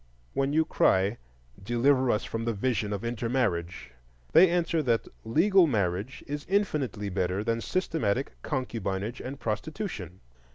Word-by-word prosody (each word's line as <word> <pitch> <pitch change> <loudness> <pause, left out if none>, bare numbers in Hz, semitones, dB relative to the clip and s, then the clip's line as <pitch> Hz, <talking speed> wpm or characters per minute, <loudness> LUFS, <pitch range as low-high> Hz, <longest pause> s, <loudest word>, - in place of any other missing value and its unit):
When 135 0 +1
you 160 +2 +3
cry, 100 -4 +2 0.4
Deliver 125 +5 +2
us 105 - +1
from 115 0 -4
the 115 - 0
vision 105 -2 0
of 100 +2 -3
intermarriage, 115 - -1 0.4
they 180 +2 +7
answer 170 -2 +1
that 120 -5 +1 0.2
legal 175 - +4
marriage 100 - -1
is 145 0 -4
infinitely 150 - 0
better 95 +1 -1
than 115 0 0
systematic 140 - -1
concubinage 115 -5 -3
and 135 +2 -6
prostitution. 110 - -4
120 Hz, 130 wpm, -28 LUFS, 100-145 Hz, 0.4 s, they